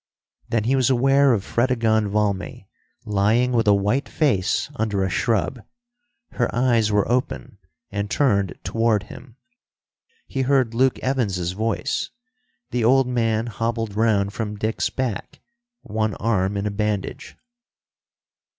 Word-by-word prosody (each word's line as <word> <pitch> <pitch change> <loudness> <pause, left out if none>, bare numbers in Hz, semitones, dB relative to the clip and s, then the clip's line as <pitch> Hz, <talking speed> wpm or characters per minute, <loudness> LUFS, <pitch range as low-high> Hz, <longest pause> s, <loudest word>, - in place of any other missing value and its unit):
Then 115 -2 +1
he 130 +5 +2
was 130 -1 +2
aware 135 +2 +4
of 105 -5 +1
Fredegonde 115 -4 +1
Valmy 105 +3 -2 0.4
lying 105 +5 +2
with 115 -2 +1
a 105 - +6
white 105 +8 0
face 120 - 0
under 105 -6 -1
a 95 - -1
shrub. 115 +4 0 0.7
Her 120 - 0
eyes 120 -3 +2
were 105 -1 +2
open, 120 - -2 0.3
and 100 0 -3
turned 100 -10 +1
toward 115 -3 +1
him. 120 +3 -13 0.9
He 135 - -3
heard 130 -3 +2
Luke 130 +2 +2
Evans's 100 -10 0
voice. 110 +4 -2 0.6
The 120 -1 0
old 130 +3 +4
man 115 -3 0
hobbled 115 -2 -3
round 105 -3 +1
from 105 -2 -4
Dick's 110 +2 -1
back, 125 -7 -4 0.4
one 110 -1 -2
arm 100 -2 0
in 100 - -2
a 105 - -1
bandage. 105 -1 -3
110 Hz, 130 wpm, -22 LUFS, 105-125 Hz, 0.9 s, a